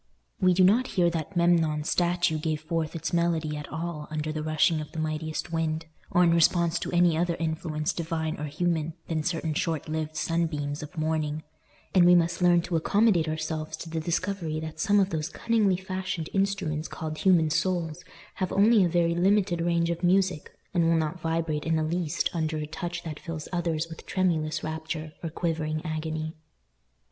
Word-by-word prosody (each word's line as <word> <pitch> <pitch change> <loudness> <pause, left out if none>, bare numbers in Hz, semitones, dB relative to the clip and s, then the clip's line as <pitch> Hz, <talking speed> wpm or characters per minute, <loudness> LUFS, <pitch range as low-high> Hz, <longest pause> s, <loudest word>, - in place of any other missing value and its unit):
We 185 -1 +4
do 185 - +5
not 225 +8 +4
hear 175 -1 +4
that 165 +3 -4
Memnon's 165 -3 +2
statue 175 -2 +1
gave 155 -1 -2
forth 160 0 -2
its 165 +1 -3
melody 165 -3 +1
at 150 -2 -7
all 160 -1 -4
under 155 0 -2
the 155 0 -3
rushing 155 +1 +2
of 150 - -8
the 160 - -4
mightiest 155 +1 -3
wind, 160 0 -1 0.2
or 180 - +4
in 170 -1 +4
response 170 0 +3
to - - -4
any 175 -2 +4
other 170 +1 +1
influence 160 -1 -2
divine 160 -2 -2
or 150 - -3
human 160 +1 -1
than 160 -2 -1
certain 165 -1 -1
short 160 -1 -1
lived 155 0 -3
sunbeams 155 -3 -1
of 155 +3 -9
morning; 155 -1 -1 0.5
and 180 -2 +6
we 180 - +8
must 170 +1 +2
learn 175 -1 +5
to 175 -1 -2
accommodate 190 0 +3
ourselves 155 0 -3
to 165 - -8
the 165 - -1
discovery 170 -1 -2
that 155 0 -7
some 205 +5 +3
of 195 0 +2
those 160 0 -2
cunningly 215 -5 +1
fashioned 185 -3 -4
instruments 190 -6 0
called 155 -1 -5
human 170 -5 +4
souls 170 0 -1 0.3
have 185 -2 -1
only 210 +1 +5
a 175 - +2
very 170 0 +2
limited 185 -1 +2
range 170 0 +1
of 170 - -4
music, 185 -3 +2 0.2
and 175 -2 +3
will 165 - +4
not 160 +2 -2
vibrate 165 -2 -1
in 165 - +2
the 160 - +1
least 165 -1 0
under 160 -2 -1
a 155 - -3
touch 170 +2 -5
that 155 -3 -6
fills 160 -3 -6
others 165 -2 -1
with 165 -1 -10
tremulous 165 -5 0
rapture 160 0 -4
or 165 - -3
quivering 155 -1 -2
agony. 155 0 -3
165 Hz, 185 wpm, -27 LUFS, 155-175 Hz, 0.5 s, we